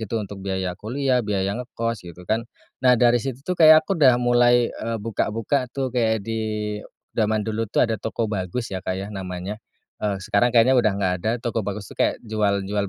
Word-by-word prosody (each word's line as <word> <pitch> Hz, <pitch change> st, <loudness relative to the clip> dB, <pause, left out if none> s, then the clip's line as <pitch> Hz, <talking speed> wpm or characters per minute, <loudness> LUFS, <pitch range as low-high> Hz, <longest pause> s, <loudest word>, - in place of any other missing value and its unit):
gitu, 110 Hz, +1 st, -3 dB
untuk 100 Hz, -2 st, -7 dB
biaya 95 Hz, -1 st, -2 dB
kuliah, 125 Hz, +6 st, 0 dB
biaya 100 Hz, -3 st, -1 dB
ngekos 115 Hz, -3 st, -3 dB
gitu 90 Hz, 0 st, -12 dB
kan. 110 Hz, +5 st, -1 dB, 0.3 s
Nah 125 Hz, -1 st, +5 dB
dari 120 Hz, 0 st, +4 dB
situ 135 Hz, +2 st, -6 dB
tuh 180 Hz, -, -1 dB
kayak 155 Hz, 0 st, +8 dB
aku 195 Hz, -, -1 dB
udah 130 Hz, -4 st, +7 dB
mulai, 120 Hz, 0 st, +3 dB
eee, 115 Hz, 0 st, -4 dB
buka-buka 115 Hz, +4 st, -1 dB
tuh 130 Hz, 0 st, -3 dB
kayak 110 Hz, -4 st, +1 dB
di, 105 Hz, -2 st, -3 dB, 0.3 s
zaman 110 Hz, -1 st, 0 dB
dulu 110 Hz, 0 st, -2 dB
tuh -, -, +3 dB
ada 115 Hz, -2 st, -2 dB
Tokobagus 110 Hz, -1 st, -3 dB
ya 95 Hz, -, -3 dB
Kak 95 Hz, -1 st, -3 dB
ya, 95 Hz, +1 st, -4 dB
namanya, 95 Hz, +2 st, -5 dB, 0.4 s
eee, 105 Hz, -2 st, -1 dB
sekarang 100 Hz, +5 st, +1 dB
kayaknya 120 Hz, +1 st, +4 dB
udah 110 Hz, -4 st, +2 dB
nggak 95 Hz, -2 st, +1 dB
ada, 110 Hz, -, 0 dB
Tokobagus 105 Hz, -3 st, -3 dB
tuh -, -, -16 dB
kayak -, -, +2 dB
jual 105 Hz, -3 st, 0 dB
jual 100 Hz, 0 st, -1 dB
110 Hz, 190 wpm, -23 LUFS, 100-120 Hz, 0.4 s, kayak